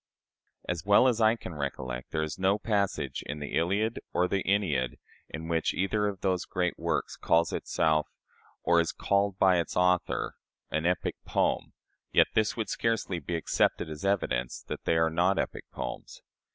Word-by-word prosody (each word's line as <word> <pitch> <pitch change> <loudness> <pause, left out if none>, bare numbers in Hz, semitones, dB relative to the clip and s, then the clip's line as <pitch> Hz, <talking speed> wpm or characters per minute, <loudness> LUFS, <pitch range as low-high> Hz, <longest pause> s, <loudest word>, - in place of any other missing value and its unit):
As 85 -2 -2
well 100 +6 +6
as 120 -3 +2
I 110 +1 +5
can 90 -6 -8
recollect, 65 -4 -4
there 80 -1 -1
is 75 +2 -5
no 95 +2 +3
passage 100 -2 -1
in 75 - -4
the 75 -1 -6
"Iliad" 100 +7 +1
or 90 - +2
the 95 +1 0
"Æneid" 80 -11 +1 0.3
in 80 +1 -6
which 80 -1 0
either 105 +2 +1
of 100 -3 -4
those 95 -2 0
great 90 -1 -1
works - - -1
"calls 85 0 +2
itself," 80 -1 +1 0.6
or 85 -1 +4
is 85 0 -1
called 100 +2 +1
by 95 -2 +5
its 85 - -3
author, 90 0 +1 0.3
an 80 +2 0
epic 90 -1 0
poem, - - 0 0.4
yet - - +6
this 110 +1 +1
would 110 - -2
scarcely 115 -6 -1
be 85 +3 -4
accepted 80 -1 +1
as 75 +2 -7
evidence 90 -11 0
that - - -7
they 80 - +2
are 80 0 +3
not 90 +4 +2
epic - - -2
poems. 60 -1 -6
90 Hz, 175 wpm, -29 LUFS, 80-100 Hz, 0.6 s, well